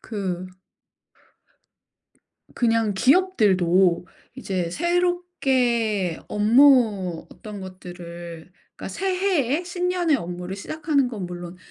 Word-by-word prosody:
그 185 Hz, -4 st, -4 dB, 2.1 s
그냥 225 Hz, -3 st, +1 dB
기업들도 190 Hz, -, +3 dB, 0.3 s
이제 185 Hz, -9 st, -3 dB
새롭게 265 Hz, -, 0 dB
업무 215 Hz, -, +4 dB
어떤 210 Hz, -2 st, -9 dB
것들을 175 Hz, -2 st, -9 dB, 0.3 s
그러니까 -, -, -7 dB
새해에 360 Hz, -, 0 dB
신년의 360 Hz, -3 st, 0 dB
업무를 180 Hz, -1 st, -6 dB
시작하는 295 Hz, +3 st, 0 dB
건 215 Hz, -7 st, -5 dB
물론 175 Hz, 0 st, -8 dB
215 Hz, 200 characters per minute, -23 LUFS, 180-295 Hz, 2.1 s, 업무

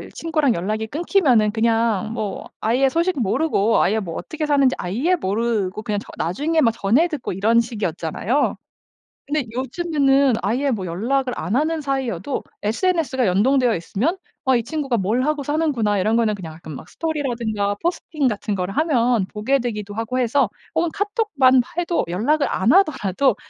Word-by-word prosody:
친구랑 310 Hz, -6 st, +1 dB
연락이 215 Hz, +5 st, -2 dB
끊기면은 275 Hz, -, +2 dB
그냥 225 Hz, -2 st, +1 dB
뭐 210 Hz, -3 st, -4 dB
아예 255 Hz, +5 st, +2 dB
소식 335 Hz, -2 st, 0 dB
모르고 225 Hz, -1 st, +2 dB
아예 220 Hz, +4 st, +2 dB
뭐 170 Hz, -5 st, -5 dB
어떻게 315 Hz, -1 st, -4 dB
사는지 275 Hz, -3 st, +3 dB
아예 245 Hz, -, 0 dB
모르고 215 Hz, -, -1 dB
그냥 210 Hz, -3 st, -1 dB
저 -, -, -13 dB
나중에 300 Hz, -, 0 dB
막 230 Hz, -, +4 dB
전해 230 Hz, -, +2 dB
듣고 300 Hz, -7 st, -4 dB
이런 220 Hz, +5 st, +3 dB
식이었잖아요. 215 Hz, -, -1 dB, 0.7 s
근데 290 Hz, -2 st, -1 dB
요즘에는 275 Hz, 0 st, +2 dB
아예 255 Hz, +8 st, 0 dB
뭐 195 Hz, -4 st, -3 dB
연락을 250 Hz, +9 st, -1 dB
안 200 Hz, -, -3 dB
하는 310 Hz, +3 st, +1 dB
사이여도 265 Hz, -, -2 dB, 0.2 s
SNS가 265 Hz, -, +1 dB
연동되어 245 Hz, +4 st, +3 dB
있으면 255 Hz, -, -2 dB, 0.3 s
'아. 260 Hz, -1 st, +3 dB
이 235 Hz, -, -1 dB
친구가 280 Hz, -4 st, -1 dB
뭘 215 Hz, +6 st, 0 dB
하고 295 Hz, -1 st, -1 dB
사는구나.' 265 Hz, -10 st, 0 dB
이런 220 Hz, +4 st, +2 dB
거는 220 Hz, -3 st, +2 dB
그냥 170 Hz, -5 st, -8 dB
가끔 160 Hz, -2 st, -10 dB
뭐 -, -, -8 dB
스토리라든가 235 Hz, -10 st, -2 dB
포스팅 320 Hz, -4 st, -1 dB
같은 210 Hz, -2 st, -1 dB
걸 180 Hz, +1 st, -2 dB
하면 245 Hz, -, +2 dB
보게 250 Hz, +6 st, +1 dB
되기도 210 Hz, -4 st, -4 dB
하고 225 Hz, +3 st, -2 dB
해서 245 Hz, -2 st, +2 dB, 0.2 s
혹은 335 Hz, 0 st, +1 dB
카톡만 405 Hz, -, +2 dB, 0.2 s
해도 345 Hz, 0 st, 0 dB
연락을 280 Hz, -, +1 dB
안 210 Hz, +8 st, +2 dB
하더라도 275 Hz, -, +2 dB
245 Hz, 365 characters per minute, -21 LUFS, 210-295 Hz, 0.7 s, 막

